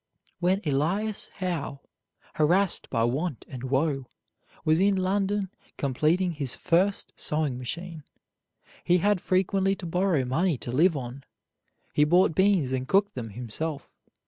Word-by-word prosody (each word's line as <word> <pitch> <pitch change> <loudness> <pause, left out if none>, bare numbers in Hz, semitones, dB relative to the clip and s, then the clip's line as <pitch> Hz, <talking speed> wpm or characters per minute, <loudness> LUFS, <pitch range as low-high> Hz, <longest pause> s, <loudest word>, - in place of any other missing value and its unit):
When 185 +3 +2
Elias 175 +10 0
Howe, 170 -7 -3 0.5
harassed 175 +5 +2
by 115 -3 +1
want 135 +4 -1
and 130 0 -7
woe, 135 0 0 0.6
was 155 +1 +4
in 200 +1 +4
London 195 +1 0 0.3
completing 155 +7 +1
his 145 -6 -2
first 190 +4 +1
sewing 150 -5 -1
machine, 165 +5 -6 0.8
he 175 - +4
had 200 0 +2
frequently 195 +1 +1
to 190 - -9
borrow 175 -5 +1
money 160 +5 +1
to 120 - -6
live 160 +5 +3
on. 130 +1 -7 0.7
He 150 - +4
bought 175 +3 +4
beans 190 -7 +3
and 130 0 -2
cooked 200 +1 +3
them 120 -3 -5
himself. 125 +7 -5
165 Hz, 135 wpm, -27 LUFS, 135-190 Hz, 0.8 s, was